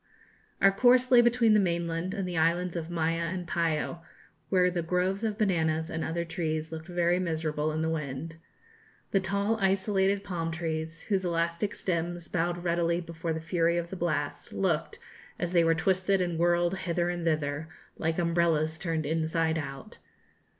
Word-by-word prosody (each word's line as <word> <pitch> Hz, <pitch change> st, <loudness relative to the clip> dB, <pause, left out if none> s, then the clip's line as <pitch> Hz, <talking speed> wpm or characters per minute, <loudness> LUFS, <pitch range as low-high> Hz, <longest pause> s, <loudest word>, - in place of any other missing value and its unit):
Our 195 Hz, -, +7 dB
course 250 Hz, +5 st, +4 dB
lay 245 Hz, -1 st, +8 dB
between 240 Hz, -2 st, +4 dB
the 210 Hz, -, +6 dB
mainland 170 Hz, 0 st, -1 dB
and 195 Hz, -3 st, -2 dB
the 180 Hz, -, -4 dB
islands 170 Hz, +2 st, +1 dB
of 165 Hz, -1 st, -4 dB
Maya 165 Hz, -1 st, 0 dB
and 180 Hz, 0 st, -4 dB
Payo, 165 Hz, -1 st, -1 dB, 0.5 s
where 180 Hz, -1 st, +3 dB
the 175 Hz, -1 st, -1 dB
groves 180 Hz, +4 st, 0 dB
of 215 Hz, -2 st, -1 dB
bananas 160 Hz, -5 st, +1 dB
and 160 Hz, -, -2 dB
other 170 Hz, +1 st, -2 dB
trees 160 Hz, -2 st, -3 dB
looked 160 Hz, 0 st, -7 dB
very 175 Hz, 0 st, +1 dB
miserable 155 Hz, -3 st, -1 dB
in 155 Hz, +1 st, -2 dB
the 160 Hz, -, 0 dB
wind. 155 Hz, +1 st, -4 dB, 0.7 s
The 195 Hz, -, +3 dB
tall 200 Hz, +3 st, 0 dB
isolated 195 Hz, 0 st, +1 dB
palm 175 Hz, -4 st, -3 dB
trees, 160 Hz, 0 st, -4 dB
whose 195 Hz, -3 st, 0 dB
elastic 170 Hz, +3 st, -1 dB
stems 175 Hz, -1 st, -2 dB
bowed 175 Hz, 0 st, -1 dB
readily 170 Hz, 0 st, +1 dB
before 170 Hz, -1 st, -5 dB
the 160 Hz, -, -2 dB
fury 170 Hz, 0 st, +1 dB
of 170 Hz, 0 st, -3 dB
the -, -, -4 dB
blast, 155 Hz, -5 st, -2 dB
looked, -, -, -1 dB, 0.4 s
as 175 Hz, -1 st, -2 dB
they 170 Hz, -2 st, +4 dB
were 165 Hz, 0 st, +3 dB
twisted 190 Hz, +3 st, +2 dB
and 175 Hz, -3 st, -1 dB
whirled 175 Hz, +1 st, +3 dB
hither 175 Hz, -1 st, 0 dB
and 175 Hz, -1 st, -4 dB
thither, 155 Hz, -1 st, -1 dB, 0.3 s
like 160 Hz, 0 st, 0 dB
umbrellas 165 Hz, -2 st, +1 dB
turned 165 Hz, -3 st, -2 dB
inside 160 Hz, +1 st, 0 dB
out. 135 Hz, +8 st, -8 dB
170 Hz, 170 wpm, -29 LUFS, 160-185 Hz, 0.7 s, lay